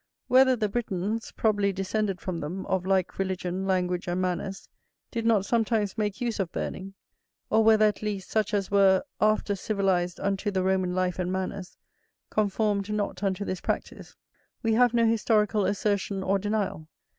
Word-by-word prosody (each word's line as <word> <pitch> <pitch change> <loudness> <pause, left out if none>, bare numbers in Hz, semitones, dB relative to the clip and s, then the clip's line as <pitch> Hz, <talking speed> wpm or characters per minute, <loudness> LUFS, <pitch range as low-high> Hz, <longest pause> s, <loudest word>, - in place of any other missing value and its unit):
Whether 260 0 +5
the 215 -3 0
Britons 215 0 -3
(probably 205 -2 +1
descended 195 0 -2
from 180 -3 -4
them, 175 +6 -5
of 185 -1 -1
like 190 -1 0
religion, 185 0 -2
language, 180 -1 0
and 175 +1 -1
manners) 185 +1 -3 0.4
did 230 -1 -2
not 210 -4 +3
sometimes 220 -3 +1
make 210 -3 -2
use 235 -3 -2
of 185 -3 -1
burning, 195 +1 -5 0.6
or 220 - +4
whether 220 -1 +6
at 210 - 0
least 205 -3 -4
such 215 -2 +1
as 200 -3 -1
were 195 -2 +5 0.2
after 215 -1 +2
civilized 190 -3 0
unto 200 +1 -1
the 190 -2 0
Roman 185 -1 +1
life 185 0 0
and 180 0 -1
manners, 190 0 -4 0.5
conformed 210 -1 0
not 210 -1 -2
unto 195 0 -1
this 185 - -4
practice, - - -4 0.5
we 225 -1 +2
have 245 +1 +4
no 230 -1 +4
historical 215 -2 +2
assertion 200 -1 -1
or 195 +1 +1
denial. 205 -6 -2
200 Hz, 165 wpm, -27 LUFS, 185-215 Hz, 0.6 s, whether